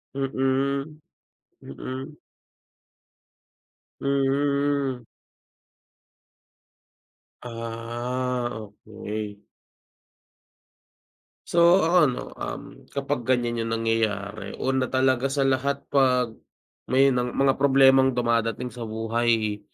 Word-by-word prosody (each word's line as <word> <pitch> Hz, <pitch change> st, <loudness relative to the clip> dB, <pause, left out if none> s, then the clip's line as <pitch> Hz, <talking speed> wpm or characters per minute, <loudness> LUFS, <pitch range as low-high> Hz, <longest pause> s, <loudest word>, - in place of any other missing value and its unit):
Mm, 135 Hz, +2 st, -1 dB, 0.6 s
mm. 130 Hz, -, -7 dB, 1.9 s
Mm. 140 Hz, 0 st, +1 dB
Hmm. -, -, -18 dB, 2.4 s
Ah 120 Hz, +2 st, -3 dB
okey. 105 Hz, 0 st, -7 dB, 2.0 s
So, 170 Hz, +2 st, +5 dB
ako 170 Hz, +3 st, +3 dB
ano, 125 Hz, -, -3 dB, 0.2 s
um, -, -, -5 dB, 0.2 s
kapag 140 Hz, -3 st, -3 dB
ganyan 120 Hz, -2 st, +1 dB
yung 115 Hz, 0 st, -2 dB
nangyayari 105 Hz, -3 st, -2 dB
una 130 Hz, -1 st, +1 dB
talaga 130 Hz, 0 st, +2 dB
sa 135 Hz, 0 st, 0 dB
lahat 135 Hz, +1 st, 0 dB
pag 125 Hz, -4 st, +3 dB, 0.6 s
may 135 Hz, +1 st, +4 dB
nang 125 Hz, -1 st, -1 dB
mga 135 Hz, 0 st, +2 dB
problemang 135 Hz, -1 st, +5 dB
dumadating 115 Hz, 0 st, 0 dB
sa 115 Hz, 0 st, -7 dB
buhay 110 Hz, -1 st, 0 dB
130 Hz, 80 wpm, -25 LUFS, 115-135 Hz, 2.4 s, So